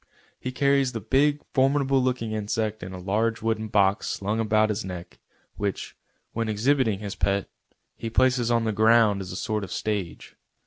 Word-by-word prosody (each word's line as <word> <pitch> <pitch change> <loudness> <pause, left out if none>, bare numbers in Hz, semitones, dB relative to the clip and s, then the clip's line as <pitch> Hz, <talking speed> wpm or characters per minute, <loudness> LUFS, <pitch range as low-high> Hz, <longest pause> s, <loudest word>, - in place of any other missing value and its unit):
He 130 - -4
carries 140 -1 +2
the 115 - -3
big, 145 +7 +1
formidable 135 0 +3
looking 125 -3 -1
insect 110 0 -2
in 90 +1 -7
a 95 - -7
large 110 +5 -1
wooden 110 -1 -1
box 100 -1 +2
slung 105 +3 -2
about 110 0 +2
his 105 +1 -2
neck, 90 -2 -8 0.4
which, 100 -1 -3 0.4
when 115 -1 -2
exhibiting 115 0 +2
his 100 0 -5
pet, 100 0 -1 0.5
he 115 - -4
places 125 0 +2
on 120 -1 +2
the 110 - 0
ground 110 -1 +4
as 90 - -7
a - - -6
sort 105 +1 -2
of 95 - -7
stage. 105 -5 -4
110 Hz, 175 wpm, -25 LUFS, 100-125 Hz, 0.5 s, ground